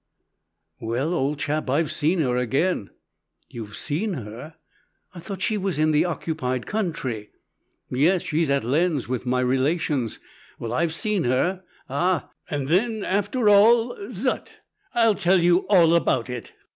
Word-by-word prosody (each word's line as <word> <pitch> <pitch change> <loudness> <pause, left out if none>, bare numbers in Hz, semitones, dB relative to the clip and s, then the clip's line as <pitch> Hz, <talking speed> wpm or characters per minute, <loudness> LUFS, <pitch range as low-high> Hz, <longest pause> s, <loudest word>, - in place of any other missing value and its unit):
"Well, 125 +9 -1
old 145 -2 0
chap, 145 0 -2
I've 150 +4 +1
seen 165 +3 +1
her 125 -4 +1
again." 125 - 0 0.6
"You've 105 -3 -8
seen 180 +8 -1
her? 120 +6 -8 0.6
I 180 - -9
thought 190 +2 -6
she 215 -2 0
was 190 -3 -2
in 155 +1 +3
the 155 +2 +3
occupied 130 -7 -3
country?" 145 - -3 0.6
"Yes, 165 +8 +2
she's 160 0 0
at 140 -3 +1
Lens, 150 +3 +1
with 125 0 -3
my 125 +1 +1
relations. 130 0 0 0.4
Well, 115 0 -5
I've 160 +3 0
seen 210 -1 0
her 175 +10 0 0.2
ah, 170 +5 0 0.2
and 145 -2 -2
then, 215 +6 +1
after 205 +4 0
all, 225 +4 +5 0.2
zut! - - -3 0.3
I'll 230 -2 +4
tell 190 -1 +3
you 175 +1 +3
all 170 -5 +5
about 130 -7 +1
it. 120 -3 -7
160 Hz, 145 wpm, -24 LUFS, 130-185 Hz, 0.6 s, all